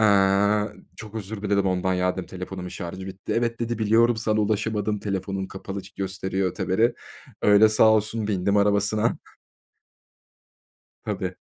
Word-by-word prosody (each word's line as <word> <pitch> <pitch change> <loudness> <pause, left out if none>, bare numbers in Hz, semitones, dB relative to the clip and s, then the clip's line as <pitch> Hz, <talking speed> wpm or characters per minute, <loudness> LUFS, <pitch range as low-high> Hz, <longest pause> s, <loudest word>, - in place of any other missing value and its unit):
Eee, 100 0 +4 0.3
çok 110 -1 -10
özür 105 -1 -6
diledim 100 -1 +1
ondan. 95 0 +1
"Ya!" 90 0 +1
dedim. 95 -1 -6
"Telefonumun 90 0 -7
şarjı 95 +2 -7
bitti." 95 0 -6
"Evet." 115 0 -1
dedi. 115 -1 -2
"Biliyorum, 115 +2 +3
sana 110 0 0
ulaşamadım, 105 0 0
telefonun 95 -1 -3
kapalı 95 +1 -7
ç 95 - -13
gösteriyor." 95 -1 -2
öteberi. 95 +6 +1 0.5
Öyle 105 +1 +6
sağ 110 +1 +5
olsun 110 0 +1
bindim 100 0 +1
arabasına. 105 +2 +2 1.9
Tabii. - - -3
100 Hz, 135 wpm, -24 LUFS, 95-110 Hz, 1.9 s, Öyle